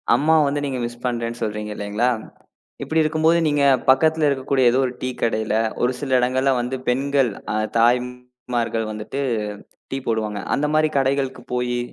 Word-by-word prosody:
அம்மாவ 160 +1 +4
வந்து 145 +1 -1
நீங்க 130 -2 -3
மிஸ் 120 0 -7
பண்றேன்னு 120 -1 -2
சொல்றீங்க 105 0 -3
இல்லீங்களா? 105 +5 0 0.7
இப்படி 160 0 +1
இருக்கும்போது 160 +2 +2
நீங்கப் 140 -3 +3
பக்கத்துல 155 +2 +4
இருக்கக்கூடிய 130 -2 +2
ஏதோ 130 - +2
ஒரு 125 - -3
டீ 130 - -1
கடையில 110 -1 0 0.3
ஒரு 125 - +3
சில 140 -2 -4
இடங்கள்ல 130 +2 +2
வந்து 125 +2 -2
பெண்கள் 135 0 +1 0.5
தாய்மார்கள் 125 -1 0
வந்துட்டு 110 +6 -5 0.7
டீ 135 - -2
போடுவாங்க. 110 -2 -1 0.2
அந்த 150 - 0
மாரி 155 0 +3
கடைகளுக்குப் 135 -1 -1
போயி 125 0 -1
125 Hz, 145 wpm, -22 LUFS, 120-140 Hz, 0.7 s, அம்மாவ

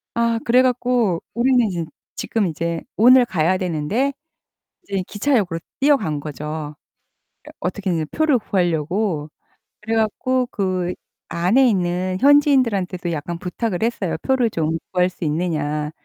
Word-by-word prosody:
아 235 0 +1
그래 250 +2 +4
갖고 245 -7 +1
우리는 245 -1 +3
이제 175 -4 -3 0.3
지금 220 -4 -1
이제 165 0 -3
오늘 250 +3 +7
가야 180 -3 +1
되는데 185 - -1 0.7
이제 195 - -2
기차역으로 205 -7 0 0.2
뛰어간 265 - +2
거죠. 150 +1 -6 0.7
그래 - - -13
어떻게든 180 -3 -2
표를 310 -4 +2
구하려고. 175 -3 -1 0.5
그래 225 +1 -2
갖고 250 +4 0
그 185 -4 -2 0.3
안에 200 +11 +3
있는 185 -3 0
현지인들한테도 235 - +3
약간 165 +2 -4
부탁을 180 +3 -3
했어요. 200 -8 -1
"표를 255 -3 +2
좀 160 -3 -1
구할 180 -1 +2
수 180 - -10
있느냐." 150 -2 -1
185 Hz, 290 characters per minute, -21 LUFS, 170-235 Hz, 0.7 s, 오늘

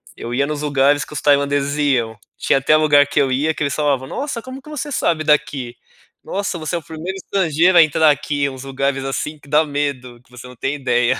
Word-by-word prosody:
eu 120 +1 -6
ia 140 +2 +1
nos 150 -1 -4
lugares 145 0 +2
que - - -14
os 150 - -4
tailandeses 140 0 +2
iam, 125 -7 0 0.2
tinha 135 - +2
até 155 +3 +4
lugar 145 -2 +5
que 145 - 0
eu 135 - +2
ia 150 +5 +1
que - - -9
eles 140 -1 -1
falavam: 140 -3 0
"Nossa, 275 - -4
como 260 +3 -9
que 300 - -14
você 300 0 -5
sabe 160 - 0
daqui? 145 -5 0 0.5
Nossa 200 -2 -3
você 155 +1 -4
é - - -1
o 160 - -18
primeiro 165 +4 -6
estrangeiro 180 -2 +2
a 165 - +9
entrar 155 +1 +3
aqui, 145 0 -1
uns 130 -1 -9
lugares, 135 0 -2
assim, 150 +3 -4
que 140 0 -18
dá 155 +1 +3
medo, 140 -5 -4
que 125 - -30
você 125 0 -11
não 125 - -13
tem 135 +4 -2
ideia." 125 -2 +1
145 Hz, 230 wpm, -19 LUFS, 135-155 Hz, 0.5 s, a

